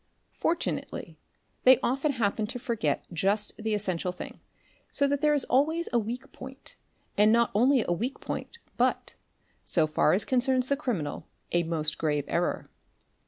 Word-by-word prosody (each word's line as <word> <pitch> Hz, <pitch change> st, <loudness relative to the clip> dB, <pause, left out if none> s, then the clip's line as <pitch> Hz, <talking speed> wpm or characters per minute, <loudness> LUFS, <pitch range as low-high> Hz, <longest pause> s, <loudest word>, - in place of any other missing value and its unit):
For 335 Hz, -, 0 dB
tunately -, -, -5 dB, 0.5 s
they 255 Hz, 0 st, +8 dB
often 275 Hz, +4 st, +1 dB
happen 215 Hz, -3 st, 0 dB
to 245 Hz, -, -4 dB
forget 230 Hz, -, -1 dB
just 200 Hz, +5 st, +1 dB
the 220 Hz, 0 st, 0 dB
essential 185 Hz, -3 st, -1 dB
thing; 180 Hz, -, -9 dB, 0.5 s
so 280 Hz, -, +2 dB
that 280 Hz, 0 st, 0 dB
there 300 Hz, -1 st, +4 dB
is 280 Hz, -, +1 dB
always 315 Hz, +6 st, +1 dB
a 240 Hz, -, +4 dB
weak 245 Hz, +5 st, -5 dB
point, 260 Hz, +1 st, -10 dB, 0.4 s
and 210 Hz, +1 st, +6 dB
not 235 Hz, 0 st, +3 dB
only 250 Hz, +3 st, +4 dB
a 175 Hz, -, +2 dB
weak 240 Hz, +10 st, -3 dB
point, -, -, -5 dB, 0.2 s
but, -, -, +1 dB, 0.5 s
so 160 Hz, -3 st, +2 dB
far 155 Hz, 0 st, +2 dB
as 195 Hz, +2 st, +2 dB
concerns 255 Hz, 0 st, +2 dB
the 280 Hz, -, +3 dB
criminal, 210 Hz, -, -3 dB, 0.2 s
a 175 Hz, -, +3 dB
most 160 Hz, -2 st, -1 dB
grave 150 Hz, -3 st, 0 dB
error. 170 Hz, +1 st, -1 dB
230 Hz, 165 wpm, -28 LUFS, 180-265 Hz, 0.5 s, they